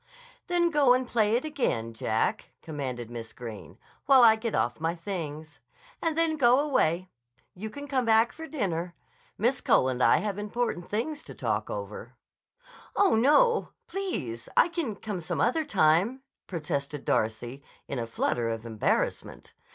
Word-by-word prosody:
"Then 345 -1 +2
go 280 -5 +5
and 255 0 -1
play 220 -2 +2
it 250 - 0
again, 120 - -1
Jack," 110 0 -1
commanded 130 -7 -5
Miss 115 -2 -7
Greene, 115 -4 -9 0.3
"while 265 -2 +7
I 225 -2 +8
get 220 0 -3
off 120 0 0
my 165 +2 -1
things. 155 -5 -6 0.4
And 325 -2 -1
then 325 -1 +2
go 250 -2 +5
away. 185 - +1 0.4
You 215 +4 -6
can 285 +5 -8
come 265 -3 +1
back 225 0 +4
for 320 0 -8
dinner. 180 - -2 0.4
Miss 240 +6 +1
Cole 130 - +3
and 130 -1 -2
I - - +6
have 205 -1 -2
important 210 -3 -2
things 285 +8 -2
to - - -10
talk - - -2
over." - - -6 0.8
"Oh, 400 -2 +4
no! 300 - +4
Please! 185 - -4
I - - +6
can 320 -11 -3
come 200 -3 -5
some 160 - -3
other 285 +7 +2
time," 200 - +2 0.2
protested 150 -4 -4
Darcy 120 +5 -1 0.3
in 135 - -3
a 115 - -3
flutter 115 0 -1
of 115 0 -4
embarrassment. 110 -2 -2
205 Hz, 160 wpm, -28 LUFS, -, 0.8 s, I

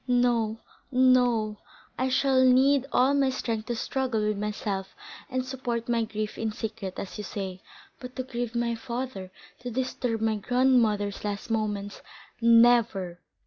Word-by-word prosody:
No, 240 -3 +2 0.3
no; 245 -5 +3 0.4
I 260 +1 0
shall 260 0 +3
need 265 +2 +4
all 260 +3 +4
my 275 -1 +3
strength 230 -4 -3
to 240 - -1
struggle 255 -1 -1
with 215 - 0
myself 200 -2 -3 0.3
and 255 0 -2
support 245 -3 -3
my 235 -1 +1
grief 215 0 -4
in 225 -1 -1
secret, 210 -3 -5
as 200 - -6
you - - -4
say. 190 -2 -5 0.4
But 250 0 -9
to 255 - -3
grieve 240 -2 -4
my 235 0 0
father—to 235 -2 -7
disturb 250 -2 -2
my 220 -1 +1
grandmother's 225 -4 +2
last 205 +2 -4
moments—never!" 215 -1 +1
235 Hz, 140 wpm, -27 LUFS, 210-255 Hz, 0.4 s, need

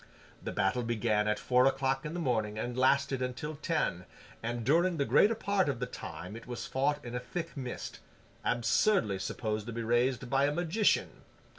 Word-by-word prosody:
The - - -4
battle 95 +6 +1
began 110 -2 +1
at 105 0 +1
four 125 +1 +3
o'clock 135 +1 0
in 160 - -6
the - - -2
morning 110 -8 0
and 120 +3 -3
lasted 135 +1 +2
until 130 +4 -4
ten, 150 - -1 0.4
and 120 +1 -3
during 170 +5 +3
the 140 - +1
greater 220 +9 +4
part 200 -6 +1
of 135 - -2
the - - -1
time 90 +5 -8
it 115 - -10
was 120 -1 -5
fought 145 +2 0
in 120 - -6
a 125 - -1
thick 165 +7 -5
mist—absurdly 125 - -1
supposed 110 +2 -3
to 120 - -5
be 115 +1 -3
raised 120 +2 +1
by 135 +2 +3
a 145 - +2
magician. 175 +6 +1
125 Hz, 180 wpm, -31 LUFS, 115-150 Hz, 0.4 s, greater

